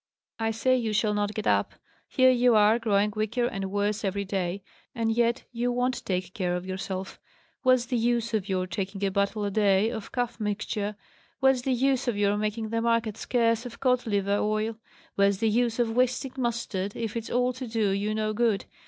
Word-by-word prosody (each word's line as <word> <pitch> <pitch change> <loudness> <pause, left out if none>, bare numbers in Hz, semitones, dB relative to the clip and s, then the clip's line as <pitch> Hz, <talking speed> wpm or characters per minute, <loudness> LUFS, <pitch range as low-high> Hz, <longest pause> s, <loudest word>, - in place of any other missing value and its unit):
"I 225 0 0
say 255 +4 +2
you 230 -4 -1
shall 210 0 +2
not 205 0 -1
get 215 - -3
up. - - +1 0.3
Here 260 -1 +5
you 245 -1 +4
are, 215 +2 +5
growing 210 -2 +1
weaker 220 +3 0
and 195 -5 -3
worse 205 +2 -1
every 200 0 -1
day, 190 0 -2 0.3
and 225 -2 0
yet 235 +2 +1
you 245 +1 -1
won't 250 +1 -1
take 185 -3 -2
care 180 -2 -1
of 180 +1 -4
yourself! 190 0 -5 0.4
Where's 255 -2 +4
the 250 0 -1
use 235 0 0
of 205 -2 -1
your 185 -1 0
taking 195 +2 -4
a 195 - 0
bottle 200 +2 0
a 200 - -2
day 205 +1 +3
of 220 -3 -6
cough 245 -1 -2
mixture 210 0 -2 0.4
where's 265 -1 +4
the 265 - -1
use 265 +1 +1
of 235 -4 0
your 205 0 +2
making 215 +1 -2
the 230 +1 -1
market 230 -2 +1
scarce 230 -1 +1
of 245 -2 -9
cod 250 -2 +1
liver 200 -1 +1
oil 215 +1 0 0.4
where's 200 0 +3
the 225 +2 +1
use 235 0 +1
of 235 -2 +1
wasting 255 +1 +1
mustard, 230 -6 -2
if 225 0 -4
it's 230 -1 -4
all 250 +1 +1
to 255 0 -6
do 220 -3 0
you 205 +2 -1
no 215 0 -1
good? 220 -3 +1
220 Hz, 205 wpm, -27 LUFS, 200-240 Hz, 0.4 s, Here